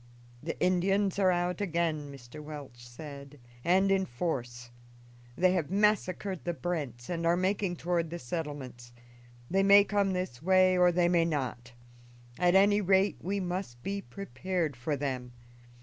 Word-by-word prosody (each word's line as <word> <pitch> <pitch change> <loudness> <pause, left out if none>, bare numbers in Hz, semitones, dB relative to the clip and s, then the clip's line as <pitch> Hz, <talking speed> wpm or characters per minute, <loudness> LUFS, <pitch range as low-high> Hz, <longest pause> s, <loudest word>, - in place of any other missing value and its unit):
"The 165 - -5
Indians 195 +2 +1
are 190 -2 +4
out 175 +1 0
again," 165 -6 -1
Mr. 135 +2 -11
Welch 140 -5 -9
said, 140 +2 -10 0.2
"and 190 +3 +3
in 190 -1 +2
force. 120 -4 -4 0.7
They 185 0 +4
have 170 -6 -1
massacred 195 -2 0
the 175 -1 -2
Brents 145 -10 -4
and 170 -1 -3
are 170 +1 +3
making 190 0 0
toward 170 -1 -1
the 170 - -5
settlements. 130 -5 -6 0.5
They 195 +6 +2
may 200 +1 +7
come 200 -1 0
this 180 -9 -4
way 185 +1 +4
or 180 -1 +5
they 175 0 +2
may 170 -1 +3
not; 125 -6 -3 0.7
at 180 0 +3
any 205 +2 +5
rate, 190 +1 +3
we 200 +3 -2
must 180 -9 -4
be 200 0 -3
prepared 180 -3 -3
for 130 +5 -2
them. 130 -3 -4
175 Hz, 150 wpm, -30 LUFS, 140-190 Hz, 0.7 s, may